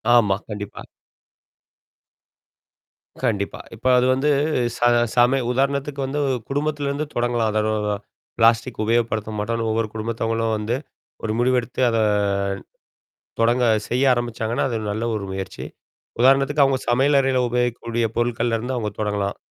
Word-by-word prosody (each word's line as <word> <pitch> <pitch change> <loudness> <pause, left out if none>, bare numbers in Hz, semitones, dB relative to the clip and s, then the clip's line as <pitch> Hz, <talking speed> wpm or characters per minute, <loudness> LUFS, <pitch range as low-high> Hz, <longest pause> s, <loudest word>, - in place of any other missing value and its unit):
ஆமா, 105 -5 +4
கண்டிப்பா. 105 -1 -6 2.4
கண்டிப்பா. 100 -5 -1 0.2
இப்ப 115 - -20
அது 125 - +3
வந்து 135 +3 +1 0.5
ச - - -10 0.3
சம 125 +2 +4
உதாரணத்துக்கு 140 +2 -1
வந்து 140 +2 -3 0.3
குடும்பத்திலருந்து 145 0 -1
தொடங்கலாம். 120 -2 +1
அதாவது, 105 -1 0 0.4
பிளாஸ்டிக் 115 +1 +3
உபயோகப்படுத்த 110 -1 0
மாட்டோம்ன்னு, 115 +2 -1
ஒவ்வொரு 110 0 0
குடும்பத்தவங்களும் 115 0 -1
வந்து, 105 +3 -1 0.5
ஒரு 110 - -1
முடிவு 125 +1 +3
எடுத்து 125 +1 -5
அத 115 - 0 1.4
தொடங்க 120 +2 +3 0.2
செய்ய 125 +3 +1
ஆரம்பிச்சாங்கன்னா, 120 -1 -1
அது 115 -3 -2
நல்ல 110 +3 -2
ஒரு 100 - -4
முயற்சி. 95 0 -6 0.6
உதாரணத்துக்கு 135 +3 +4
அவுங்க 135 -1 +2
சமையல் 135 +4 +4
அறையில 135 -1 +2
உபயோகிக்கக்கூடிய 120 -1 -1
பொருட்கள்ல 120 -1 0
இருந்து 125 +4 -3
அவங்க 110 -3 -2
தொடங்கலாம். 105 -1 -1
120 Hz, 120 wpm, -22 LUFS, 110-130 Hz, 2.4 s, ஆமா